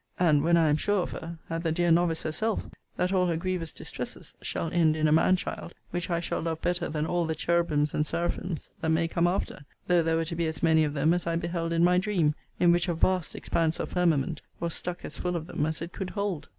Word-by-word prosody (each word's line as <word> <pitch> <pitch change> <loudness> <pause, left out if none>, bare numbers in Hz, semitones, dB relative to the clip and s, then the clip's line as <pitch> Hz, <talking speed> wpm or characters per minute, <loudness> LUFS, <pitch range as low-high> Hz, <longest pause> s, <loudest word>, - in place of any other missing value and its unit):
and 155 -5 +4
(when 170 +1 +4
I 160 -2 +4
am 150 - +3
sure 205 +2 +1
of - - -6
her) 165 +1 -6
at 165 0 -3
the 165 -1 0
dear 175 +1 +2
novice 165 -1 +2
herself, 210 +8 -1 0.3
that 180 +2 0
all 180 -1 +3
her 170 -2 0
grievous 180 -2 -2
distresses - - -7
shall 165 - -3
end 160 -3 +4
in 155 0 +2
a - - +2
man 165 +4 +5
child; 185 - -5 0.2
which 175 0 -3
I 170 -1 +1
shall 170 - -2
love 160 -1 -2
better 175 0 0
than 150 0 -1
all 170 0 0
the 160 - -1
cherubims 155 -2 +1
and 150 - +2
seraphims 170 +1 -3
that 160 - 0
may 165 +1 +2
come 170 +1 +1
after; 175 -5 -2 0.2
though 175 -1 +4
there 165 0 +1
were 165 0 0
to 170 +1 -4
be 165 -1 0
as 160 +1 -5
many 160 -1 +5
of 150 -1 -1
them 155 +4 +3
as 175 -1 -2
I 165 - +1
beheld 170 0 -2
in 170 0 +2
my 180 +1 +5
dream; 180 -7 +1 0.3
in 175 -1 +5
which 175 +1 +2
a 175 - 0
vast 180 0 +1
expanse 165 -1 0
of - - -3
firmament 165 -3 +1 0.2
was 170 -1 -2
stuck 180 0 -4
as - - -6
full 180 0 -1
of 165 -2 -3
them 150 -3 -1
as 155 0 -3
it 170 - -8
could 190 -2 -4
hold! 200 -6 -3
170 Hz, 255 wpm, -28 LUFS, 160-175 Hz, 0.3 s, man